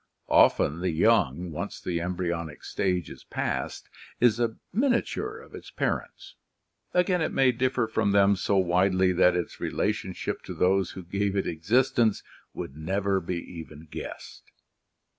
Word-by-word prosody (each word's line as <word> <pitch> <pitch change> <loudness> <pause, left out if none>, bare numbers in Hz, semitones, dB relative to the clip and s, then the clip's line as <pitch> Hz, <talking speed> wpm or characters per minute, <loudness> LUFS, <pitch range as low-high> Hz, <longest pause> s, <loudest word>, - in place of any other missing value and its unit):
Often 80 +4 +4
the 90 +1 0
young, 85 - +2
once 75 - -5
the 85 -2 -2
embryonic 85 -3 -3
stage 90 -4 -1
is - - -11
past, - - -3 0.3
is 120 -2 +4
a 115 -2 0 0.2
miniature 275 - 0
of 460 - -14
its - - -9
par - - 0
ents, - - -16 0.6
again 180 0 +2
it 155 - 0
may 130 -1 +4
differ 125 0 0
from 110 -2 0
them 100 0 +5
so 100 +2 0
widely 95 +1 +3
that 90 0 +4
its 90 -1 -3
relationship - - -2
to - - -6
those 95 0 +2
who 95 - -8
gave 100 +3 -1
it 100 - 0
existence 110 +6 +2 0.3
would 65 - -7
never 95 +5 0
be 90 0 -3
even 80 -2 -9
guessed. - - -8
95 Hz, 150 wpm, -27 LUFS, 85-115 Hz, 0.6 s, them